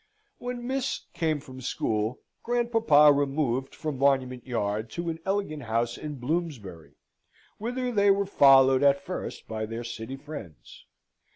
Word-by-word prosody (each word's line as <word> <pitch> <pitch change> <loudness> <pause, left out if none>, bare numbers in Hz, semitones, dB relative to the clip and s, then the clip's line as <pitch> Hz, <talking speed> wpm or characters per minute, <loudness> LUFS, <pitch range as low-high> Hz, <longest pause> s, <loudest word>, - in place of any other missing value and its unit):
When 245 0 -5
Miss 265 +1 -2
came 155 -3 0
from 130 -2 -11
school, 110 -1 -2 0.2
grandpapa 225 -12 +4
removed 135 -2 -1
from 150 -4 -4
Monument 130 -3 +1
Yard 110 -2 -2
to 170 0 -3
an 160 - -7
elegant 195 -6 -1
house 115 0 -1
in 150 -1 -6
Bloomsbury; 125 - -4 0.6
whither 245 +3 -2
they 205 -3 +3
were 200 0 +3
followed 135 -7 +6
at 140 0 +4
first 185 - -6
by 110 -1 -4
their 115 +2 -5
city 115 +2 -6
friends. 135 - -10
140 Hz, 135 wpm, -27 LUFS, 120-180 Hz, 0.6 s, followed